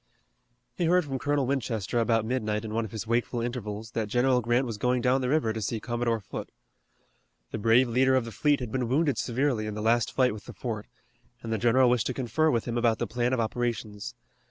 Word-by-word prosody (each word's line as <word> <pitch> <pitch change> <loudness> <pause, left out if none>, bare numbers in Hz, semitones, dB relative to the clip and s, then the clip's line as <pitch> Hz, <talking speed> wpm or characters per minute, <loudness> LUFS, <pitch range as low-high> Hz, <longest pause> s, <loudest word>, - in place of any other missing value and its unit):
He 170 - -1
heard 180 0 +3
from 135 -2 -3
Colonel 145 -1 +1
Winchester 120 -5 -1
about 115 -1 +2
midnight 110 -3 -1
in 110 - -5
one 115 0 0
of 105 - -9
his 110 0 -5
wakeful 120 +1 0
intervals 115 -2 -4
that 115 -2 -2
General 125 +3 +2
Grant 120 +3 +1
was 115 -4 -5
going 125 +2 +2
down 125 +2 +2
the 125 - -1
river 140 -7 +1
to 110 - -4
see 110 +2 -2
Commodore 120 0 -1
Foote. 100 - -7 1.0
The 110 - -4
brave 115 +4 +4
leader 130 +3 +3
of 130 -3 +1
the 115 - -7
fleet 145 +3 +1
had 120 -3 -5
been 130 -1 -1
wounded 145 +2 +2
severely 125 -3 0
in 105 - -4
the - - -4
last 115 -1 +2
fight 125 -4 +2
with 105 - -10
the - - -9
fort, 110 -4 -5 0.6
and 115 -1 -3
the 110 - -1
general 125 +3 +4
wished 120 -2 +2
to 130 - -3
confer 135 +5 +1
with 115 -5 0
him 120 0 -1
about 115 -2 +2
the - - -1
plan 120 +1 -1
of 130 - +1
operations. 115 -1 -3
120 Hz, 230 wpm, -27 LUFS, 110-130 Hz, 1.0 s, brave